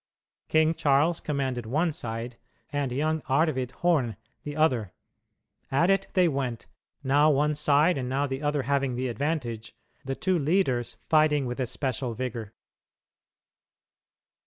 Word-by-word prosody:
King 160 0 +3
Charles 150 +2 +2
commanded 130 -5 -2
one 160 +8 +1
side, 115 -4 -5 0.3
and 140 -3 -1
young 155 +4 0
Arvid 135 -3 +1
Horn 140 -8 0 0.3
the 145 -1 -6
other. 130 - +1 0.8
At 170 +8 +3
it 195 0 +1
they 180 -2 +4
went, 135 -6 -2 0.4
now 145 +3 +4
one 150 +1 +2
side 150 +2 +3
and 125 -1 -3
now 135 +2 0
the 135 0 -4
other 145 -2 0
having 135 -1 0
the 130 +1 -2
advantage, 120 -4 -3 0.3
the 135 0 -3
two 185 +2 0
leaders 140 -6 0
fighting 155 -3 +3
with 125 +1 -4
especial 130 -1 -2
vigor. 115 -3 -5
140 Hz, 135 wpm, -27 LUFS, 125-155 Hz, 0.8 s, they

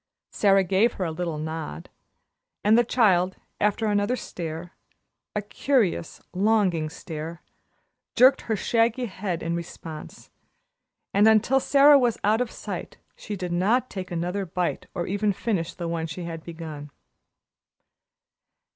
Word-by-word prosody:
Sara 195 -2 +4
gave 195 +6 +2
her 185 - -3
a 165 - -2
little 165 -1 -3
nod, 155 - -5 0.8
and 210 +2 +5
the 240 - +5
child, 190 -7 +3 0.2
after 210 +2 +1
another 205 +3 +1
stare, 170 -5 -6 0.6
a 210 - -1
curious, 210 - 0
longing 185 -5 +2
stare, 160 +1 -7 0.7
jerked 255 +2 +6
her 220 - +2
shaggy 230 +4 +1
head 185 -5 -4
in 165 +1 -1
response, 160 -2 -8 0.8
and 205 +2 +5
until 220 +5 +4
Sara 280 +1 +6
was 240 -4 +1
out 215 +3 +3
of 250 - -1
sight - - -7 0.2
she 210 - -6
did 180 -2 -4
not 215 +9 +1
take 185 -2 -5
another 180 +3 -2
bite 180 0 -2
or 175 -2 -2
even 205 +2 0
finish 185 -5 -2
the 170 - -4
one 165 -1 -2
she 165 +3 -6
had 165 -1 -6
begun. 160 -3 -8
190 Hz, 140 wpm, -25 LUFS, 170-220 Hz, 0.8 s, jerked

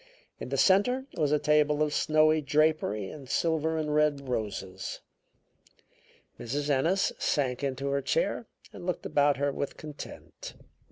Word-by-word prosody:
In - - -6
the - - -1
center 250 +8 +3
was 150 -3 +1
a 150 - +4
table 150 0 +3
of 150 -1 -1
snowy 155 0 +3
drapery 145 -9 +1
and 140 -4 -11
silver 160 0 +1
and 150 -1 -1
red 150 -2 +1
roses. 100 -5 -4 1.4
Mrs. 145 +5 -2
Ennis 165 +8 +2
sank 130 -3 0
into 135 0 -2
her 140 0 0
chair - - -1 0.3
and - - -9
looked 180 -1 -3
about 145 -1 +3
her 140 +1 0
with 140 0 -4
content. 150 -2 -9
150 Hz, 145 wpm, -29 LUFS, 140-155 Hz, 1.4 s, a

